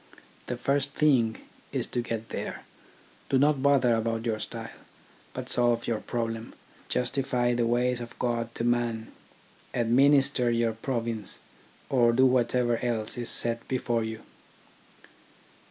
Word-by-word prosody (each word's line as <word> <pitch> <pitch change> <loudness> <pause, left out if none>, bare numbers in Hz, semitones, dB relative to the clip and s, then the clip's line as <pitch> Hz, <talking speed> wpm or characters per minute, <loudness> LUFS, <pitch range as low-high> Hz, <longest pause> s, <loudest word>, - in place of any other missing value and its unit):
The 125 - -3
first 140 +2 0
thing 125 -7 +3 0.3
is - - 0
to 120 - -1
get 115 -1 -5
there. - - -5 0.7
Do 135 - +3
not 145 0 +3
bother 135 -4 +4
about 115 0 -1
your 110 -2 -1
style, 115 +1 -7 0.5
but - - -6
solve 120 -1 +2
your 115 -2 -1
problem, 115 0 -4 0.3
justify 125 -1 0
the 120 -1 +1
ways 120 +1 +1
of 120 0 -9
God 120 -1 -1
to - - -3
man, 120 -2 0 0.6
administer 130 +1 +4
your 115 -1 +1
province, 115 -3 -3 0.5
or 120 -3 +3
do 130 +2 +5
whatever 125 -1 +2
else 115 -3 -1
is 120 -2 -4
set 115 0 +1
before 120 -3 0
you. 110 0 -5
120 Hz, 135 wpm, -28 LUFS, 115-125 Hz, 0.7 s, do